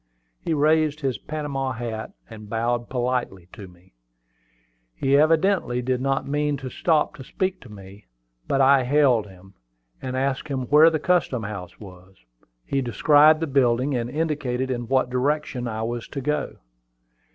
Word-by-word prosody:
He 160 - -2
raised 155 0 +2
his 130 -6 -2
Panama 140 -4 -4
hat, 115 -2 -5 0.2
and 110 -2 -11
bowed 120 +1 -1
politely 120 -8 -2
to 100 -4 -10
me. 90 -2 -21 1.0
He 135 - +1
evidently 155 -4 +2
did 130 0 -1
not 135 0 -1
mean 145 0 0
to 130 -1 -7
stop 160 -3 +1
to 135 - -9
speak 185 +7 -3
to 125 - -14
me; 100 -3 -13 0.4
but 135 - +1
I 135 0 +5
hailed 125 -5 +3
him, 95 0 -17 0.5
and 130 -1 -4
asked 135 +2 -2
where 145 +4 +4
the 160 - -1
custom 155 -7 0
house 100 -4 -7
was. 95 -2 -14 0.5
He 140 - -1
described 150 +5 +4
the - - +1
building, 130 -1 +1
and 120 -1 -2
indicated 130 -4 -2
in 120 -2 -3
what 130 0 +1
direction 130 -1 -1
I 110 -1 -4
was 120 0 -4
to 140 - -6
go. 150 +3 -2
130 Hz, 155 wpm, -23 LUFS, 115-150 Hz, 1.0 s, I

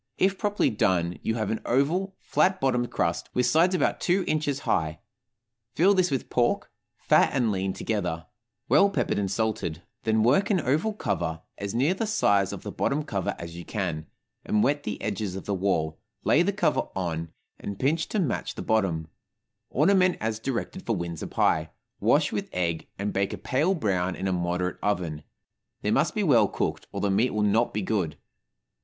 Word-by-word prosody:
If 190 0 +2
properly 205 -1 +1
done, 90 -4 +1
you 110 - -1
have 110 -3 -1
an 110 - -2
oval, 175 +10 +1
flat 190 0 +2
bottomed 125 -4 +1
crust, - - -1
with 125 - +3
sides 170 +8 +4
about 165 - +1
two 185 +2 +2
inches 145 -3 -1
high; 80 -1 0 0.8
fill 190 +5 +5
this 185 -2 +3
with 135 -3 -2
pork, 120 -1 +1 0.3
fat - - +4
and 120 -5 +2
lean 95 -1 -1
together, 90 -7 -2 0.4
well 200 - +5
peppered 200 - 0
and 100 -2 -1
salted; 100 -6 -2 0.2
then 110 -1 +2
work 145 - +3
an 195 -4 +3
oval 155 - +1
cover, 80 - -2 0.2
as 100 +2 -4
near 140 +9 +3
the 215 +3 -2
size 100 - +2
of - - -7
the - - -5
bottom 150 +2 0
cover 100 -10 -2
as 85 -1 -8
you 85 - -7
can, 85 -8 -3 0.4
and 105 - +1
wet 145 +2 +2
the 105 - -3
edges 105 -3 -2
of 95 - -6
the 100 - -1
wall, 85 -5 0 0.2
lay 155 - +4
the 185 +3 +2
cover 205 +2 +1
on, 85 -3 -3 0.3
and 100 -1 -5
pinch 155 +7 +1
to - - -3
match 160 -10 -1
the - - -5
bottom; 95 -8 +1 0.6
ornament 185 +4 +3
as 110 -1 -2
directed 135 +10 -3
for 115 - 0
Windsor 85 -3 -4
pie, - - +1 0.3
wash - - +3
with - - -3
egg, 85 -3 -1
and 100 +1 -2
bake 100 0 0
a - - -4
pale 155 +9 +1
brown 95 - 0
in 95 - -3
a 95 - +1
moderate 90 +1 -1
oven; 85 -7 -1 0.6
they 105 - +1
must 135 +8 +2
be 210 - +1
well 120 - +5
cooked, - - -3
or - - -4
the 100 - +1
meat 110 +6 +3
will 105 - +1
not 110 +3 +2
be 105 - -2
good. 95 -7 -1
110 Hz, 190 wpm, -26 LUFS, 95-150 Hz, 0.8 s, fill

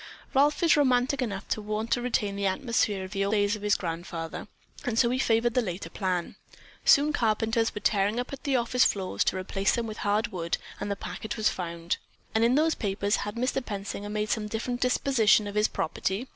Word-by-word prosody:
"Ralph 290 +5 +3
is 330 - +6
romantic 265 -1 +2
enough 200 -6 -3
to 215 - -1
want 215 +2 -3
to 245 - +2
retain 215 -5 0
the 200 0 0
atmosphere 205 -2 0
of 185 - -8
the 195 -1 0
days 205 0 +2
of 210 - -9
his 210 0 +2
grandfather, 165 -1 -5 0.4
and 245 -5 -2
so 235 -1 +4
he 255 - 0
favored 235 -1 +2
the 250 - +3
latter 180 -5 -5
plan. 185 -3 -2 0.5
Soon 290 +1 +5
carpenters 225 0 +1
were 210 - -4
tearing 205 +2 +2
up 250 - -4
the 275 -2 0
office 250 +1 +3
floors 185 - +1
to - - +1
replace 195 +1 0
them 235 - -1
with 215 -1 -6
hard 210 +2 0
wood 170 -5 -2 0.2
and 205 - -3
the 200 - 0
packet 215 +2 -6
was 220 0 +3
found." 170 -1 -3 0.4
"And 220 - +3
in 240 +2 +4
those 315 +2 +3
papers, 200 0 0
had 210 - -4
Mr. 255 +2 -1
Pensinger 205 -1 -5
made 210 0 -2
some 215 -2 -1
different 240 +3 -3
disposition 250 -4 +3
of 205 - -5
his 210 +1 +3
property?" 190 +8 -2
215 Hz, 205 wpm, -28 LUFS, 195-245 Hz, 0.5 s, is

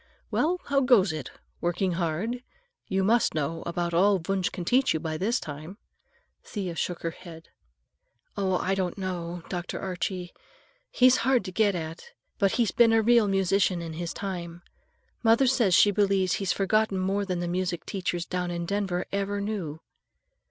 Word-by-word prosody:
"Well, 350 +4 +1
how 280 -1 +2
goes 215 -9 +4
it? 155 -4 -5 0.3
Working 175 +2 0
hard? 175 +8 -2 0.5
You 190 -1 0
must 225 0 +3
know 160 +2 -2
about 170 0 -2
all 195 +4 +4
Wunsch 190 +1 -1
can 175 - -6
teach 260 0 +3
you - - 0
by 160 0 -3
this 210 +9 0
time." 155 +6 -8 0.7
Thea 185 -5 -5
shook 175 +1 -3
her 165 - -1
head. 165 -2 -12 0.9
"Oh, 195 -2 -1
no, - - +3
I 190 - 0
don't, 180 -2 -3
Dr. 175 -1 -4
Archie. 180 -1 -4 0.6
He's 255 0 +5
hard 255 0 +2
to 185 - -5
get 205 0 +2
at, 165 - -6 0.3
but 195 -3 +3
he's 235 -4 +2
been 230 -1 +5
a 225 -1 +4
real 235 -1 +5
musician 195 -1 +2
in 165 -1 -6
his 170 +1 -4
time. 175 -3 -6 0.6
Mother 230 +3 +4
says 240 -8 +3
she 205 - +6
believes 195 -2 +2
he's 195 - +1
forgotten 205 0 +1
more 195 +2 0
than 185 -3 -2
the 175 - -2
music 180 0 -2
teachers 175 -3 -3
down 180 -1 -2
in 170 0 -3
Denver 190 -2 -1
ever 200 0 -1
knew." 190 -7 -4
190 Hz, 170 wpm, -27 LUFS, 175-205 Hz, 0.9 s, she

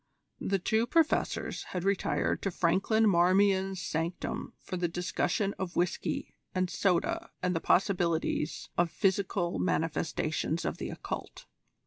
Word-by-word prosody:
The 195 - 0
two 220 +5 +1
Professors 320 +4 +1 0.2
had 175 - -2
retired 195 0 +1
to 195 - 0
Franklin 195 +6 +2
Marmion's 190 +1 +3
sanctum 165 0 -3
for 185 - -6
the 175 -1 0
discussion 180 +3 -1
of 185 -2 -4
whisky 175 0 -1 0.2
and 185 -1 0
soda 335 - +1
and 180 -1 +1
the - - +1
possibilities 170 -5 +1
of 175 -1 +3
physical 190 - 0
manifestations 160 - -1
of - - -2
the - - -3
Occult. - - -6
185 Hz, 125 wpm, -30 LUFS, 170-200 Hz, 0.2 s, Marmion's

